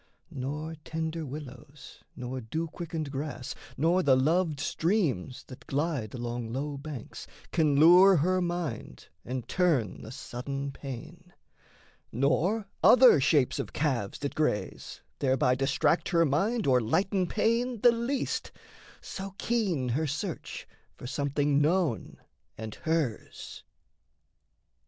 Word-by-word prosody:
Nor 150 +3 -4
tender 160 -1 -3
willows, 140 0 -10
nor 125 0 -5
dew 160 +9 -3
quickened 160 -3 -5
grass, 140 -2 -4 0.2
Nor 170 +6 +3
the 140 -6 +4
loved 155 +3 +1
streams 145 - -1
that 130 - -13
glide 140 -6 -2
along 120 -1 -4
low 140 +4 -3
banks, 140 -3 -8 0.2
Can 155 -4 +2
lure 180 +5 +8
her 185 +4 +2
mind 175 -3 -4
and 125 -1 -5
turn 155 - +1
the 110 - -9
sudden 135 +2 -5
pain; 155 +7 -9 0.8
Nor 180 - +1 0.2
other 250 - +8
shapes 140 -1 +2
of - - -4
calves 130 -10 -1
that 140 - -4
graze 105 -11 -2 0.2
thereby 130 -2 +2
Distract 135 +5 +1
her 170 -2 +4
mind 200 - +1
or 125 -2 +4
lighten 185 - +1
pain 230 +4 0
the 240 - +7
least 240 +4 -2 0.5
So 195 0 -7
keen 190 - 0
her 150 +6 0
search 145 +2 -5 0.3
for - - -10
something 140 +1 +1
known 160 -4 0 0.4
and 110 -1 -6
hers. 160 -7 -3
150 Hz, 120 wpm, -29 LUFS, 130-175 Hz, 0.8 s, lure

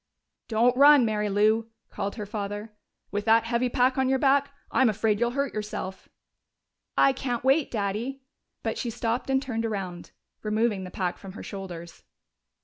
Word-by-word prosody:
"Don't 235 +2 +3
run, 285 -1 +7
Mary 210 -1 0
Lou!" 215 +3 +2 0.2
called 200 0 -3
her 210 -3 -5
father. 205 +1 -5 0.4
"With 205 +1 -2
that 225 0 +5
heavy 235 +2 0
pack 255 +2 +2
on 265 -1 +2
your 265 - +3
back! 280 +1 +3 0.2
I'm 260 -3 +4
afraid 215 0 +1
you'll 240 0 +2
hurt 280 -1 0
yourself." 210 -3 -5 0.9
"I 275 - +5
can't 245 -3 -3
wait, 270 +3 +3
Daddy." 225 +6 -3 0.4
But - - -2
she 240 - -2
stopped 230 +3 -2
and 265 0 +3
turned 245 -4 -3
around, 190 -6 -4 0.3
removing 215 -2 0
the - - -7
pack 180 -1 -3
from 195 -2 -10
her - - -8
shoulders. 175 -4 -8
225 Hz, 165 wpm, -27 LUFS, 205-255 Hz, 0.9 s, run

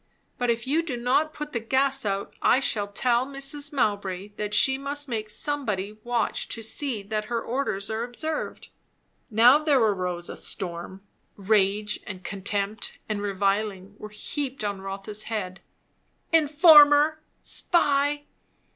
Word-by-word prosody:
But 245 -1 0
if 235 +1 0
you 300 +5 +2
do 300 -7 -4
not 260 +6 +1
put 300 -1 -7
the 235 - 0
gas 265 +1 +1
out, 195 0 -2
I 255 - +4
shall 210 -6 -1
tell 240 +4 +1
Mrs. 275 +2 -3
Mowbray 205 -7 -1
that 210 0 -5
she 265 +5 +4
must 285 +2 -4
make 220 -4 -3
somebody 210 -7 -2
watch 240 -1 -1
to 225 - -4
see 230 -1 -2
that 215 +1 -3
her 235 +1 -2
orders 225 -5 -3
are 220 +1 -2
observed." 305 +6 -4 0.6
Now 240 +5 +6
there 305 -2 +3
arose 180 -6 0
a - - -6
storm; 185 +1 -5 0.3
rage 210 +1 +1
and 185 -1 -7
contempt 200 +2 -3
and 210 -2 -2
reviling 200 0 -1
were 210 - -8
heaped 265 +4 -5
on 200 -2 -3
Rotha's 195 +2 -4
head. 195 -4 -4 0.7
"Informer!" 300 -1 +6 0.2
"Spy!" 290 -3 +2
225 Hz, 140 wpm, -26 LUFS, 200-275 Hz, 0.7 s, Now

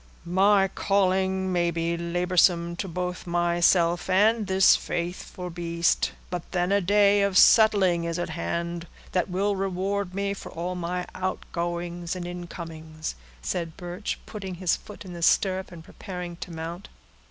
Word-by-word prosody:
"My 195 +3 +4
calling 190 -1 +1
may 175 -1 +2
be 170 0 -1
laborsome 170 0 +2
to 195 - -3
both 180 +1 -4
myself 175 0 +2
and 210 +3 +3
this 190 0 +6
faithful 180 +1 -4
beast, 170 0 0 0.2
but 180 -1 -2
then 180 0 +1
a 200 0 +3
day 205 +2 +4
of 200 -2 +2
settling 195 -8 +6
is 170 0 -2
at 175 - -2
hand, 170 +1 -3 0.2
that 180 0 0
will 200 +3 0
reward 195 0 -2
me 200 0 -1
for 200 - -9
all 175 +2 -3
my 180 0 -3
outgoings 175 -1 -3
and 180 -1 -5
incomings," 165 -3 -6 0.3
said 165 -3 -3
Birch, 180 +3 -4
putting 195 -4 -6
his 175 -1 +1
foot 210 -1 -11
in 180 - -8
the 170 - -7
stirrup, 190 +2 +2
and 170 -2 -10
preparing 180 -1 -7
to - - -7
mount. 170 +3 -6
180 Hz, 150 wpm, -26 LUFS, 170-190 Hz, 0.3 s, this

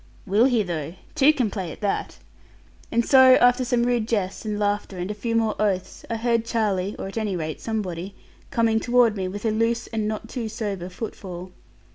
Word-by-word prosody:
'Will 210 +4 +4
he 245 -5 +3
though? 165 -3 -4 0.2
Two 275 +3 +6
can 250 -9 0
play 185 -6 -4
at - - -10
that.' 205 -2 -2 0.7
And 235 0 +2
so 260 -1 +8
after 245 +1 +4
some 245 -1 +1
rude 240 -2 +1
jests, 205 -3 -2
and 210 -1 -2
laughter, 205 -2 -1
and 180 +3 -3
a - - -2
few 230 +2 -3
more 225 -2 +2
oaths, 195 -3 -1
I 230 - -1
heard 230 0 +1
Charlie 210 -4 -1
(or - - -5
at 195 +3 -4
any 210 -3 -1
rate 155 -2 -4
somebody) 195 -4 -4 0.3
coming 225 -1 +2
toward 240 -2 +3
me, 190 -2 -2
with 205 +4 -6
a 220 - +2
loose 230 +2 0
and 220 -2 -2
not 215 -1 -4
too 235 -4 -4
sober 205 -5 -4
footfall. 185 -2 -7
215 Hz, 200 wpm, -24 LUFS, 195-230 Hz, 0.7 s, so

